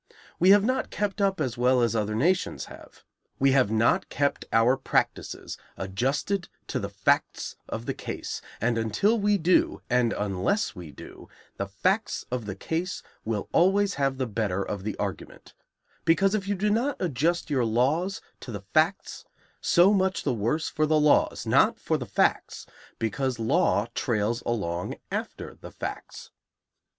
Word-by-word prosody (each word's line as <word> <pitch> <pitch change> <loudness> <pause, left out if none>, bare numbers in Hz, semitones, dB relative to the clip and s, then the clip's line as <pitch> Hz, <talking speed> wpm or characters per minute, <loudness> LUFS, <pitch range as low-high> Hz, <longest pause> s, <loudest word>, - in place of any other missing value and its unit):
We 180 - +5
have 200 0 +7
not 255 +4 0
kept 205 0 -2
up 195 -2 +1
as 125 -5 -2
well 125 +1 +4
as 115 0 +1
other 105 -1 0
nations 170 +11 +1
have. - - -14 0.3
We 135 0 +4
have 130 -5 +4
not 110 +1 +2
kept 140 0 -1
our 115 +3 +4
practices 135 - -2 0.2
adjusted 135 - -1 0.2
to - - -1
the - - -4
facts - - 0
of - - -5
the - - -2
case, - - -5 0.2
and 115 +1 +1
until 195 - +1
we 205 0 +3
do, 180 0 +2
and 125 -2 +3
unless 105 - -1
we 85 -3 -9
do, 75 - -12 0.3
the 100 - -3
facts 185 - -1
of 125 -4 -3
the 95 - -4
case 165 - -3 0.2
will 110 -2 -2
always 200 +3 +3
have 135 -1 0
the 130 - -1
better 100 -4 -1
of 100 -2 -5
the 105 0 -4
argument; 100 -5 -6 0.5
because 190 +4 +3
if 200 -2 -1
you 205 - 0
do 205 +2 0
not 250 +6 0
adjust 165 0 0
your 130 -4 +2
laws 140 - +1 0.2
to 125 - -8
the 100 -2 -5
facts, 160 +5 +1 0.4
so 185 +3 +5
much 190 -3 +1
the 135 - 0
worse 120 +9 -1
for 155 0 0
the 155 0 +3
laws, 150 -1 +3
not - - +3
for - - -1
the - - -6
facts, - - 0 0.3
because 130 +2 -1
law 115 - +2
trails 115 0 0
along 90 -7 -2 0.2
after - - -4
the - - -11
facts. - - -7
135 Hz, 165 wpm, -26 LUFS, 110-185 Hz, 0.5 s, have